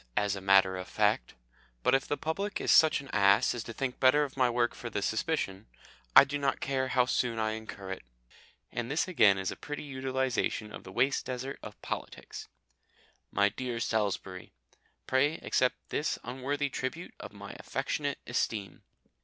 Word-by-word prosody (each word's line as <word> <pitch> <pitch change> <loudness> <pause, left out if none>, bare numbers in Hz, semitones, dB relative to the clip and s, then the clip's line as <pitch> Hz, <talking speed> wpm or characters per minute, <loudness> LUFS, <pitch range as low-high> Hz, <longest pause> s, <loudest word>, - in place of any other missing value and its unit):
as 105 -1 +2
a 95 - -6
matter 95 -1 +5
of 90 - -6
fact, - - +1 0.5
but - - +3
if 135 +1 +2
the 145 - -1
public 190 +8 -2
is - - +1
such 155 -2 +6
an 140 - -13
ass 100 +3 +4
as 120 -2 -4
to 115 - -7
think 130 +2 -3
better 135 +3 +5
of 140 - -5
my 130 -2 +3
work 120 0 +1
for 120 - -7
the 105 - -2
suspicion, 110 - -1 0.5
I - - +12
do 145 +1 -3
not 140 -1 0
care 135 -1 -1
how 130 -1 +3
soon 120 -2 0
I 110 0 0
incur 110 -3 -7
it. 95 - -5 0.7
And 120 0 -3
this 150 +6 +1
again 110 - +5
is 95 -1 -2
a - - -6
pretty 145 0 -6
utilisation 130 -5 -1
of - - -8
the 95 - -10
waste 135 +8 +1
desert 130 +1 -4
of - - -10
politics - - -6 0.8
MY 100 0 +3
DEAR 120 +2 -4
SALISBURY, 100 -5 -2 0.5
Pray 145 +4 +2
accept 130 0 +1
this 150 - -1
unworthy 135 +3 -2
tribute 130 +9 -4
of - - -8
my - - -9
affectionate - - -2
esteem. 100 -5 -2
125 Hz, 180 wpm, -30 LUFS, 105-135 Hz, 0.8 s, I